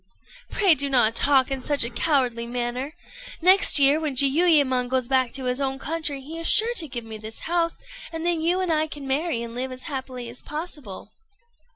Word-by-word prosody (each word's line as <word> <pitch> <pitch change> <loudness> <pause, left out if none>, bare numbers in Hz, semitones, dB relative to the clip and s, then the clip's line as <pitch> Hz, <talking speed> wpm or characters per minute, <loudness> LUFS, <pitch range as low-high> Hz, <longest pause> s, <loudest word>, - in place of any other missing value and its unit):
"Pray 390 -4 +4
do 280 -1 +1
not 240 -4 +2
talk 275 +1 +2
in 270 -1 -3
such 285 +1 -1
a 235 - -2
cowardly 245 -4 -1
manner. 245 +5 -4 0.4
Next 370 +1 +6
year, 285 +2 +4
when 305 -4 -3
Jiuyémon 275 -3 +3
goes 255 -1 0
back 260 -2 +1
to 270 - -4
his 250 +2 -1
own 270 -1 -2
country, 295 -1 -4
he 315 +5 -8
is 330 - 0
sure 455 +3 +5
to 320 - +1
give 240 -4 -6
me 220 -1 -8
this 220 +1 -9
house, 335 0 -1 0.3
and 325 0 -6
then 345 -2 0
you 350 +3 +1
and 360 -3 0
I 310 0 0
can 295 -2 -9
marry 270 -2 -1
and 230 0 -8
live 255 +2 -4
as 255 0 -10
happily 260 -4 -6
as 235 +2 -7
possible." 295 - -8
275 Hz, 205 wpm, -23 LUFS, 250-320 Hz, 0.4 s, Next